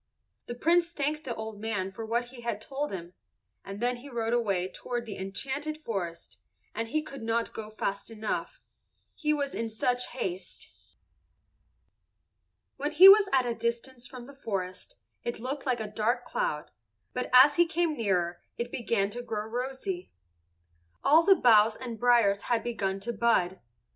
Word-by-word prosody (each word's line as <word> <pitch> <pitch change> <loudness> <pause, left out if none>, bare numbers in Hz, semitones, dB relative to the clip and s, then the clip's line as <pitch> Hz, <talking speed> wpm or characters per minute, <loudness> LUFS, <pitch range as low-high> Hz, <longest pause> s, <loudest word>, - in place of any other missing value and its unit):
The 240 - -5
Prince 335 +6 +3
thanked 300 +1 -1
the 240 -3 -3
old 220 -2 -6
man 205 -4 -2
for 225 +4 -7
what 235 +2 -1
he 250 -1 -11
had 235 -3 -2
told 275 +6 -4
him, 175 -2 -7 0.5
and 195 +1 -7
then 245 +1 0
he 270 +4 -11
rode 230 -2 -1
away 200 -7 +1
toward 240 +4 -5
the 215 - -6
enchanted 275 +11 -4
forest, 175 - -5 0.3
and 225 +1 -2
he 305 +6 -1
could 275 -3 -9
not 230 +1 -1
go 215 -1 -6
fast 200 -1 -3
enough, 220 -1 -4 0.5
he 300 -1 -1
was 285 -2 -1
in 230 0 -2
such 245 +3 0
haste. 190 -7 -6 2.1
When 295 +2 -2
he 360 +5 +10
was 400 0 +9
at 260 -2 +3
a 240 - 0
distance 235 +2 -3
from 250 -2 -10
the 280 - -12
forest, 190 -8 -5 0.3
it 240 - -3
looked 270 +4 -4
like 250 -2 +1
a 220 - -2
dark 225 +4 -1
cloud, - - -2 0.4
but 250 - -3
as 270 +3 +8
he 345 0 +5
came 330 -1 0
nearer 180 -7 0 0.2
it 240 0 -3
began 215 -4 0
to 245 - -5
grow 215 -3 -4
rosy. 265 - -4 0.9
All 315 +3 +6
the 390 +3 +6
boughs 220 - +5
and 235 -4 -7
briers 235 -5 +4
had 235 -2 +2
begun 195 -5 -2
to 235 +4 -3
bud. 200 -5 +2
235 Hz, 170 wpm, -29 LUFS, 215-270 Hz, 2.1 s, he